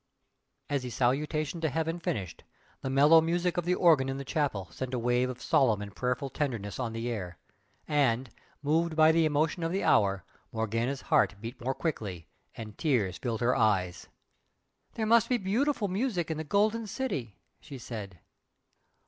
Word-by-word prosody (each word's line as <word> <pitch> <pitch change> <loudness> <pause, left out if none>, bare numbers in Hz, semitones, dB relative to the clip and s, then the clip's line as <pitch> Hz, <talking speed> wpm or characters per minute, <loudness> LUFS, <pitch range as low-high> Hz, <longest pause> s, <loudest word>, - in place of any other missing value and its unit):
As 140 -2 -1
the 125 - -5
salutation 145 +6 -1
to 160 - +1
heaven 165 +3 -2
finished, 95 - -4 0.4
the 130 - -3
mellow 145 +5 +6
music 175 +2 0
of 175 - -1
the 180 +1 +2
organ 155 -8 +4
in 135 - -3
the 140 - -6
chapel 130 - -1
sent 130 +4 -4
a - - -1
wave 125 +1 +1
of 125 -1 -6
solemn 120 -5 +2
and 105 -1 -8
prayerful 125 +2 -2
tenderness 115 -9 -3
on 120 -3 -2
the 115 +1 -4
air, 95 -8 -4 0.5
and, 130 -5 +1 0.3
moved 160 +3 +1
by 155 0 +6
the 165 0 +3
emotion 155 +3 0
of 165 0 -1
the 195 +2 -1
hour, 95 -2 +3 0.3
Morgana's 115 +4 -2
heart - - +2
beat 115 +4 -8
more 130 +2 -1
quickly 100 - -4 0.3
and 110 -2 -9
tears 115 - 0
filled 115 -3 -3
her 120 +1 +2
eyes. 95 -7 +1 0.9
"There 220 - -1
must 230 0 +4
be 250 - +3
beautiful 225 +4 0
music 190 -4 -1
in 160 - -2
the 160 - -3
Golden 215 +7 +1
City!" 140 - -4 0.2
she 145 -3 -10
said. 105 -7 -7
135 Hz, 175 wpm, -29 LUFS, 115-165 Hz, 0.9 s, mellow